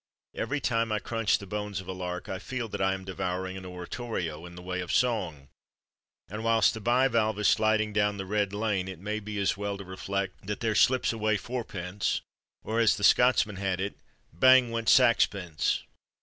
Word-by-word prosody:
Every 145 Hz, +2 st, -2 dB
time 115 Hz, -4 st, 0 dB
I 110 Hz, -, +1 dB
crunch 115 Hz, 0 st, 0 dB
the 100 Hz, -, -10 dB
bones 105 Hz, -1 st, -4 dB
of 95 Hz, -, -10 dB
a -, -, -3 dB
lark 90 Hz, -1 st, -5 dB
I 95 Hz, -, -4 dB
feel 130 Hz, +1 st, -4 dB
that -, -, -4 dB
I 95 Hz, 0 st, +2 dB
am 95 Hz, -1 st, -9 dB
devouring 95 Hz, 0 st, -3 dB
an 95 Hz, -1 st, -8 dB
oratorio, 90 Hz, -3 st, -5 dB
in 85 Hz, -, -12 dB
the 90 Hz, -, -9 dB
way 90 Hz, 0 st, -3 dB
of 90 Hz, -, -5 dB
song; 90 Hz, -, 0 dB, 0.8 s
and 105 Hz, +3 st, -6 dB
whilst 115 Hz, -2 st, +4 dB
the 110 Hz, -, -7 dB
bivalve 115 Hz, -2 st, +2 dB
is 105 Hz, -1 st, +2 dB
sliding 110 Hz, -1 st, +2 dB
down 105 Hz, -1 st, +1 dB
the 95 Hz, -, -4 dB
"red 100 Hz, 0 st, 0 dB
lane" 105 Hz, -3 st, -1 dB
it 95 Hz, -2 st, -6 dB
may 105 Hz, +5 st, -3 dB
be 105 Hz, 0 st, -6 dB
as 100 Hz, -1 st, +1 dB
well 100 Hz, -1 st, -3 dB
to 100 Hz, -, -8 dB
reflect 95 Hz, +1 st, -4 dB
that 105 Hz, -1 st, -3 dB
"there 110 Hz, -1 st, 0 dB
slips 125 Hz, +3 st, +3 dB
away 110 Hz, -1 st, +1 dB
fourpence"; 100 Hz, -4 st, -3 dB, 0.4 s
or, 110 Hz, +1 st, -1 dB
as 115 Hz, -1 st, +4 dB
the 100 Hz, -, -6 dB
Scotsman 120 Hz, -4 st, +4 dB
had 95 Hz, -1 st, -1 dB
it, 100 Hz, +1 st, -2 dB, 0.4 s
"bang 130 Hz, +6 st, +6 dB
went 115 Hz, -1 st, -1 dB
saxpence!" 100 Hz, -, +3 dB
105 Hz, 195 wpm, -28 LUFS, 95-115 Hz, 0.8 s, bang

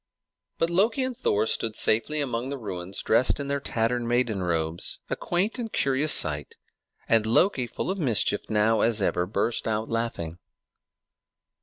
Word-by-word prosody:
But 165 Hz, +1 st, 0 dB
Loki 220 Hz, +9 st, +2 dB
and 255 Hz, -1 st, -2 dB
Thor 105 Hz, -, 0 dB
stood 110 Hz, 0 st, 0 dB
safely 130 Hz, +8 st, +2 dB
among 125 Hz, -2 st, -3 dB
the 140 Hz, -, -4 dB
ruins, 95 Hz, -5 st, -5 dB
dressed 125 Hz, +5 st, +2 dB
in 140 Hz, 0 st, -4 dB
their 140 Hz, 0 st, 0 dB
tattered 120 Hz, -1 st, -1 dB
maiden 120 Hz, -4 st, 0 dB
robes, 85 Hz, -1 st, -2 dB
a -, -, +1 dB
quaint 195 Hz, +8 st, -2 dB
and 225 Hz, -2 st, -4 dB
curious 140 Hz, +3 st, +2 dB
sight; 75 Hz, -2 st, +3 dB, 0.5 s
and 115 Hz, -1 st, +3 dB
Loki, 125 Hz, -, +2 dB
full 180 Hz, -, -4 dB
of 195 Hz, -, -4 dB
mischief 115 Hz, -, +1 dB
now 110 Hz, +1 st, +2 dB
as 115 Hz, -1 st, +2 dB
ever, 90 Hz, -2 st, 0 dB
burst 115 Hz, +4 st, -1 dB
out 110 Hz, 0 st, -2 dB
laughing. 105 Hz, -8 st, -3 dB
115 Hz, 160 wpm, -25 LUFS, 105-140 Hz, 0.5 s, sight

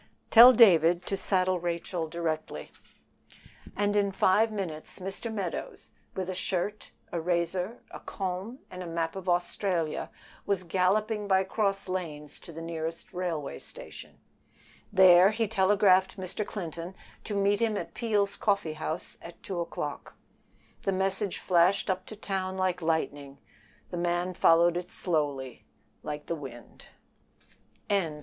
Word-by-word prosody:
"Tell 240 Hz, +2 st, +11 dB
David 175 Hz, -7 st, +6 dB
to 195 Hz, -, -1 dB
saddle 185 Hz, -1 st, +1 dB
Rachel 170 Hz, 0 st, -3 dB
directly." 155 Hz, -, -4 dB, 1.0 s
And 205 Hz, 0 st, +1 dB
in 200 Hz, -1 st, +2 dB
five 210 Hz, +4 st, +3 dB
minutes 175 Hz, -7 st, -5 dB
Mr. 195 Hz, +5 st, -5 dB
Meadows, 195 Hz, -6 st, -5 dB, 0.2 s
with 185 Hz, -1 st, -3 dB
a 185 Hz, -, -3 dB
shirt, 190 Hz, +3 st, -3 dB, 0.2 s
a 170 Hz, -, -2 dB
razor, 180 Hz, +5 st, -1 dB
a -, -, -8 dB
comb, 190 Hz, +5 st, -4 dB
and 180 Hz, 0 st, -7 dB
a 180 Hz, -, -6 dB
map 165 Hz, 0 st, -2 dB
of 190 Hz, -1 st, -4 dB
Australia, 175 Hz, -2 st, -1 dB, 0.3 s
was 200 Hz, -2 st, -1 dB
galloping 205 Hz, +4 st, +1 dB
by 190 Hz, -1 st, +4 dB
cross 195 Hz, 0 st, -1 dB
lanes 155 Hz, -6 st, -5 dB
to -, -, -11 dB
the 165 Hz, +1 st, -8 dB
nearest 165 Hz, +3 st, -5 dB
railway 170 Hz, -5 st, -3 dB
station. -, -, -10 dB, 0.7 s
There 185 Hz, -1 st, +7 dB
he 220 Hz, +1 st, 0 dB
telegraphed 190 Hz, -2 st, +3 dB
Mr. 190 Hz, +3 st, -4 dB
Clinton 175 Hz, -3 st, -6 dB, 0.3 s
to 210 Hz, -, -3 dB
meet 200 Hz, +1 st, +2 dB
him 225 Hz, -3 st, +1 dB
at -, -, -5 dB
Peel's 205 Hz, -4 st, 0 dB
Coffee 200 Hz, -7 st, 0 dB
House 155 Hz, +2 st, -5 dB
at 170 Hz, -, -12 dB
two 190 Hz, -6 st, -4 dB
o'clock. 150 Hz, -4 st, -5 dB, 0.7 s
The 195 Hz, -, 0 dB
message 195 Hz, +1 st, -1 dB
flashed 180 Hz, +2 st, +3 dB
up 185 Hz, 0 st, -4 dB
to 215 Hz, -, -8 dB
town 190 Hz, -2 st, -3 dB
like 185 Hz, -1 st, 0 dB
lightning. 145 Hz, -4 st, -2 dB, 0.5 s
The 175 Hz, -, -4 dB
man 175 Hz, +1 st, 0 dB
followed 170 Hz, -1 st, +4 dB
it 180 Hz, 0 st, -5 dB
slowly 145 Hz, -7 st, -2 dB, 0.4 s
like 150 Hz, 0 st, -5 dB
the -, -, -2 dB
wind. 135 Hz, -7 st, -10 dB, 1.0 s
CHAPTER 200 Hz, -4 st, +2 dB
LV. 150 Hz, -, -10 dB
185 Hz, 140 wpm, -29 LUFS, 170-195 Hz, 1.0 s, Tell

